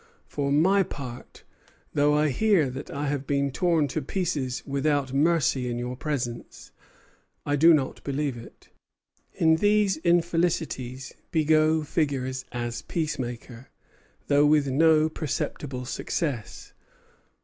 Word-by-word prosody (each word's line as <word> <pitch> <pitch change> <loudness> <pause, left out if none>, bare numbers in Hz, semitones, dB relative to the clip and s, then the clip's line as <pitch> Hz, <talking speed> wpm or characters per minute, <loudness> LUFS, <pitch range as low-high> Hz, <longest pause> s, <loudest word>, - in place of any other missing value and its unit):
For 140 -1 -3
my 185 +7 +4
part, 130 -8 -7 0.5
though 145 0 +3
I 150 0 +2
hear 170 - +2
that 130 +2 -7
I 145 +1 -4
have 140 -1 -3
been 140 -1 0
torn 165 0 +1
to 155 - -2
pieces 145 -10 -2
without 140 -1 0
mercy 140 -4 +2
in 120 - -3
your 125 +1 -4
presence, 125 -4 -5 0.7
I 145 - +1
do 165 +4 +6
not 145 -5 +1
believe 140 -1 -2
it." 115 - -13 0.7
In 160 -1 +3
these 205 -1 +2
infelicities 165 -6 0 0.2
Bigot 155 0 +2
figures 130 -4 -2
as 120 -1 -4
peacemaker, 130 -6 -5 0.6
though 145 +1 +4
with 150 -2 +3
no 155 +3 +4
perceptible 140 -4 -4
success. 130 - -4
145 Hz, 120 wpm, -26 LUFS, 130-160 Hz, 0.7 s, do